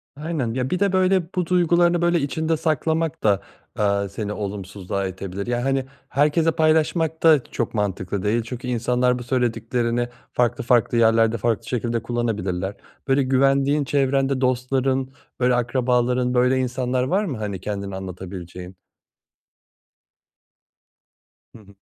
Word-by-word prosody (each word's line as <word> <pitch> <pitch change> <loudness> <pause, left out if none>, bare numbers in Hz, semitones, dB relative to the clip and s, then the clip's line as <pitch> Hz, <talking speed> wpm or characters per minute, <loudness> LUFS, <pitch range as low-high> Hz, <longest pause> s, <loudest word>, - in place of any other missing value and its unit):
Aynen. 145 -6 -3
Ya, 130 +1 -2
bir 180 - -1
de, 200 -1 +2
böyle, 185 0 +3
bu 180 -1 0
duygularını, 175 0 +3
böyle, 175 0 +3
içinde 160 +3 -1
saklamak 160 +1 -1
da, 100 -2 +3 0.4
eee, 100 -1 +1
seni 105 +1 -4
olumsuzluğa 100 -1 -4
itebilir. 95 +2 -6
Ya, 120 0 -1
hani, 135 -1 0 0.2
herkesle 150 +4 +2
paylaşmak 160 +1 +1
da 155 -5 +6
çok 120 - -4
mantıklı 100 -2 -2
değil 110 +3 +1
çünkü 125 +1 -6
insanlar 125 +1 +1
bu 120 - -6
söylediklerini 120 0 -1 0.2
farklı 120 -1 +1
farklı 120 -1 +2
yerlerde, 115 0 +4
farklı 115 +1 -1
şekilde 120 -1 -1
kullanabilirler. 105 -6 -2 0.3
Böyle, 135 0 +3
güvendiğin, 135 +2 +2
çevrende 135 -1 +1
dostların, 130 +1 0 0.3
böyle, 125 0 +3
akrabaların, 125 0 +1
böyle, 125 +1 +3
insanlar 125 0 -1
var 190 +11 +1
mı, 140 - -4
hani, 100 -4 -4
kendini 100 -2 -4
anlatabileceğin? 90 -1 -8 2.8
Hı - - -12
hı. 100 -1 -18
125 Hz, 130 wpm, -22 LUFS, 105-140 Hz, 2.8 s, da